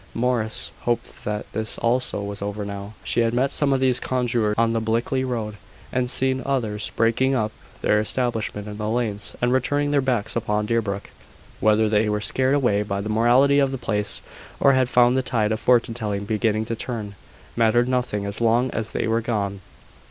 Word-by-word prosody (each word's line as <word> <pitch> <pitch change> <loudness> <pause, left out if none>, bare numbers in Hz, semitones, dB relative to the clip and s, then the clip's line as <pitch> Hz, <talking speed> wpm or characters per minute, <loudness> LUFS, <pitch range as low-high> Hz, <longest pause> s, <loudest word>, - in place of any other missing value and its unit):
Morris 115 -2 0
hoped 120 -1 -3
that 105 0 -3
this 110 0 -3
also 120 -3 0
was 100 0 -6
over 105 +1 -4
now. 100 +1 -7
She - - 0
had 115 0 +2
met 135 +2 +1
some 145 -2 +2
of 135 - +2
these 130 -1 +5
conjurors 120 -5 0
on 115 0 +2
the 115 - 0
Blickley 115 +4 0
road; 110 -5 -3 0.4
and 125 -1 0
seen 130 +1 +3
others 110 -7 -2
breaking 115 +4 +2
up 110 -3 0 0.3
their 105 - +3
establishment 110 -2 -2
in 105 0 -7
the 105 0 -3
lanes, 110 -3 -1
and 125 +1 +2
turning 145 +2 0
their 145 -1 +3
backs 120 -5 -1
upon 105 -2 0
Deerbrook. 105 -3 -2 0.5
Whether 110 +1 +3
they 105 0 +2
were 105 0 0
scared 130 +5 +1
away 120 -8 +2
by 100 -1 -3
the 105 +2 -4
mortality 125 +6 +4
of 135 -1 +2
the 135 - -3
place, 105 -3 -2 0.4
or 140 - +5
had 130 -1 +2
found 125 0 +4
the 130 - +2
tide 110 -4 0
of 110 - -1
fortune 120 -2 +3
telling 105 -3 -3
beginning 110 +1 0
to 115 - -3
turn, 110 -4 -5 0.4
mattered 120 +1 +3
nothing 125 -5 -1
as 100 +3 -5
long 120 +2 +2
as 110 -1 -4
they - - -1
were 115 +1 +1
gone. 100 -4 -2
115 Hz, 195 wpm, -23 LUFS, 105-125 Hz, 0.5 s, these